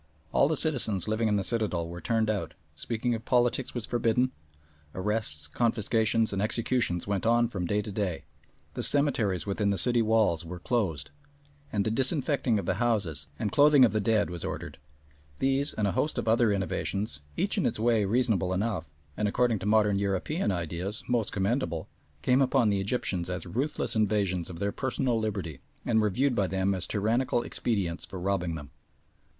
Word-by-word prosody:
All - - +4
the 160 - 0
citizens 115 - +1
living 110 +1 +1
in 105 - +2
the 100 - 0
citadel 100 -7 0
were 85 +1 -8
turned 115 -2 +1
out, 100 -7 -2 0.2
speaking 115 +9 -2
of 115 0 -4
politics 120 +1 +1
was 120 -3 -2
forbidden, 120 +2 +1 0.6
arrests, 95 -7 -1
confiscations, 110 +3 +1
and 100 - -1
executions 110 -4 0
went 100 -2 -1
on 120 +1 +3
from 95 -6 -3
day 105 +3 0
to 105 - -6
day, 95 -5 -2 0.5
the - - -4
cemeteries 125 - +2
within 100 +1 0
the 100 - 0
city 120 +1 +3
walls 110 -7 +2
were 85 +2 -7
closed, 95 -5 -2 0.6
and 100 -2 0
the 110 - 0
disinfecting 135 -1 +1
of 100 - -3
the 95 +5 -1
houses 95 -12 0
and 105 - -2
clothing 145 -2 +6
of 110 - 0
the 110 - +1
dead 105 -2 +1
was 85 -1 -5
ordered. - - -5 0.6
These, 135 - +1
and 105 - 0
a - - +1
host 150 - -1
of - - -2
other 115 0 +4
innovations, 100 -2 -2 0.2
each - - +1
in - - +2
its - - -2
way 115 -1 +2
reasonable 100 -4 +1
enough, 95 -5 -2 0.3
and, 105 - 0
according 115 +1 +1
to 100 - -4
modern 105 -2 +3
European 100 - -1
ideas, 90 +3 -4
most 120 -4 0
commendable, 95 - -1 0.4
came 130 +2 +3
upon 130 -4 +3
the 100 -1 +1
Egyptians 95 -4 -1
as 90 0 -4
ruthless 125 - -2
invasions 100 -5 0
of 85 - -7
their 100 +2 -1
personal 130 -2 -1
liberty, 95 -10 -3 0.3
and 110 -2 +3
were 105 - +2
viewed 130 +7 +1
by 100 -5 +1
them 95 +2 0
as 95 -2 0
tyrannical 120 +4 0
expedients 95 -8 -2
for 90 +1 -5
robbing 90 -3 -1
them. 75 -3 -9
105 Hz, 180 wpm, -28 LUFS, 95-120 Hz, 0.6 s, clothing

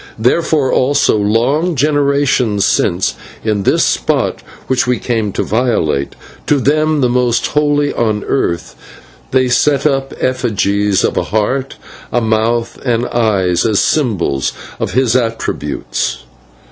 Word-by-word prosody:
Therefore, 135 +4 +1
also, 140 -1 +2
long 120 - +1
generations 140 -7 +1
since, 90 -1 +1 0.3
in 105 -2 0
this - - +2
spot - - 0 0.2
which 130 -1 0
we 125 -1 +1
came 110 -3 -2
to - - -1
violate 110 - 0 0.3
to 150 - +3
them 155 +2 +1
the 125 - +3
most 120 -1 +1
holy 145 -1 +1
on 110 -3 0
the - - -9
earth 85 -11 -2 0.5
they 130 -1 +2
set 140 +3 +2
up 135 -2 0
effigies 105 -5 0
of - - 0
a - - 0
Heart, 125 +6 -1 0.4
a 120 - +2
Mouth, 115 +1 0
and 120 -2 0
Eyes, 95 -7 +1
as 110 -3 +2
symbols 100 - 0 0.3
of - - -3
his 125 -2 +2
attributes. 115 - -2
120 Hz, 135 wpm, -15 LUFS, 105-140 Hz, 0.5 s, to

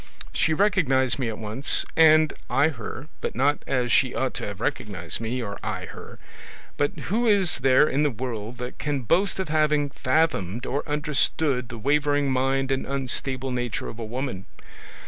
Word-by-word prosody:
She 160 - +2
recognised 140 - +2
me 125 -3 0
at 110 - -5
once, 110 +5 0
and 155 -1 +6 0.2
I 150 - +3
her, 130 0 -7
but - - -3
not 140 +4 +2
as 125 -2 0
she 130 -2 +3
ought 130 - -1
to - - -4
have 100 -1 -7
recognised 105 - -3
me, 120 +2 -2
or 100 -2 -6
I - - -4
her. - - -11 0.6
But 145 - -1 0.2
who 235 +2 +2
is 195 -8 +3
there 130 +3 +5
in 140 +1 0
the 150 - +3
world 120 -2 -5
that 125 0 -7
can 145 -2 -1
boast 180 - +1
of 190 -4 -2
having 150 -2 +2
fathomed 130 - 0
or 140 +2 -1
understood 145 -3 0
the 120 - -7
wavering 145 +2 +1
mind 135 +1 +1
and 135 - 0
unstable 135 -1 -2
nature 120 -2 -3
of 115 - -9
a - - -4
woman? 120 -4 -4
135 Hz, 175 wpm, -25 LUFS, 120-150 Hz, 0.6 s, and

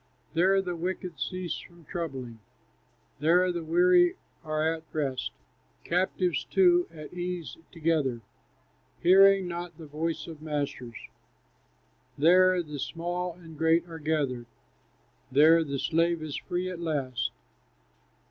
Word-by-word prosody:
"There 190 +4 +3
the 180 -2 -3
wicked 180 -1 -4
cease 185 -2 -3
from 170 -2 -16
troubling, 135 -10 -5 0.8
There 180 +4 +4
the 170 -1 -4
weary 175 +2 +4 0.3
are 155 0 0
at 165 - -7
rest; 135 -4 -2 0.5
Captives 180 -4 0
too 175 -2 +4
at 155 -1 -10
ease 180 -2 -4 0.2
together, 155 -8 0 0.8
Hearing 195 +1 +6
not 175 0 -6
the 165 - -10
voice 155 +1 -3
of 160 -2 -10
masters. 140 -6 -4 1.2
There 180 +3 +5
the 150 -2 -7
small 175 +4 -3
and 165 -2 -13
great 165 +2 +2
are 165 -1 -8
gathered, 145 -6 -1 0.8
There 160 +5 +6
the 140 -3 -3
slave 165 +2 +1
is 150 -3 -5
free 180 +1 -3
at 180 -2 -5
last." 135 -7 -1
165 Hz, 120 wpm, -28 LUFS, 150-180 Hz, 1.2 s, Hearing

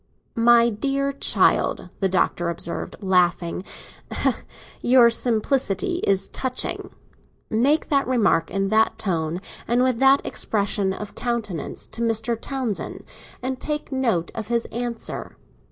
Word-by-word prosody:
"My 235 0 +5
dear 275 +5 -1
child," 280 - +2
the 195 - +1
Doctor 175 -2 +1
observed, 170 0 -2
laughing, 180 -2 +1 1.2
"your 240 -1 +6
simplicity 250 - +1
is 195 -1 +2
touching. 255 -1 -3 0.6
Make 270 +8 +2
that 280 -3 +2
remark, 210 -10 +2
in 195 0 -1
that 220 +1 +3
tone, 165 -3 -1 0.3
and 240 +2 +3
with 255 -3 +1
that 270 +1 +5
expression 200 -2 0
of 205 +2 -6
countenance, 225 - -3
to 230 - -9
Mr. 230 0 +1
Townsend, 250 -3 -4 0.4
and 260 0 -2
take 300 -1 -4
a - - -2
note 225 -11 0
of 220 -1 -5
his 235 0 0
answer. 235 -1 -5
230 Hz, 125 wpm, -23 LUFS, 195-255 Hz, 1.2 s, your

